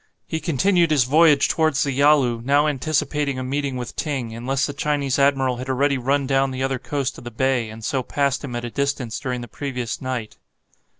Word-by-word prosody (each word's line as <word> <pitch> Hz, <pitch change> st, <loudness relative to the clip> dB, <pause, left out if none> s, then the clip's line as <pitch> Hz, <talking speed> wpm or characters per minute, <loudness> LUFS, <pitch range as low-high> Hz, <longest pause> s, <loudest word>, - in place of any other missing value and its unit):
He 160 Hz, -, -3 dB
continued 170 Hz, +2 st, +2 dB
his 150 Hz, -4 st, +4 dB
voyage 150 Hz, +2 st, +5 dB
towards 155 Hz, -4 st, +1 dB
the 140 Hz, -, -1 dB
Yalu, 135 Hz, -4 st, +3 dB
now 140 Hz, +3 st, +3 dB
anticipating 145 Hz, -1 st, -1 dB
a 130 Hz, -, -3 dB
meeting 135 Hz, 0 st, -2 dB
with 125 Hz, -1 st, -6 dB
Ting, 130 Hz, -7 st, -3 dB
unless 130 Hz, +5 st, -1 dB
the 145 Hz, -, -4 dB
Chinese 145 Hz, -2 st, -1 dB
admiral 135 Hz, -2 st, +2 dB
had 130 Hz, +2 st, -6 dB
already 140 Hz, +1 st, +1 dB
run 135 Hz, +3 st, +1 dB
down 135 Hz, 0 st, +2 dB
the 130 Hz, 0 st, -3 dB
other 135 Hz, -1 st, -1 dB
coast 140 Hz, -1 st, -3 dB
of -, -, -13 dB
the 120 Hz, -, -6 dB
bay, 125 Hz, -1 st, 0 dB
and 110 Hz, 0 st, -9 dB
so 135 Hz, -, 0 dB
passed 140 Hz, +2 st, -1 dB
him 125 Hz, -4 st, -5 dB
at 120 Hz, 0 st, -3 dB
a 120 Hz, -, -6 dB
distance 140 Hz, -4 st, -2 dB
during 125 Hz, -2 st, -3 dB
the 120 Hz, -, -7 dB
previous 125 Hz, -1 st, -4 dB
night. 125 Hz, -4 st, -4 dB
135 Hz, 205 wpm, -22 LUFS, 125-145 Hz, -, voyage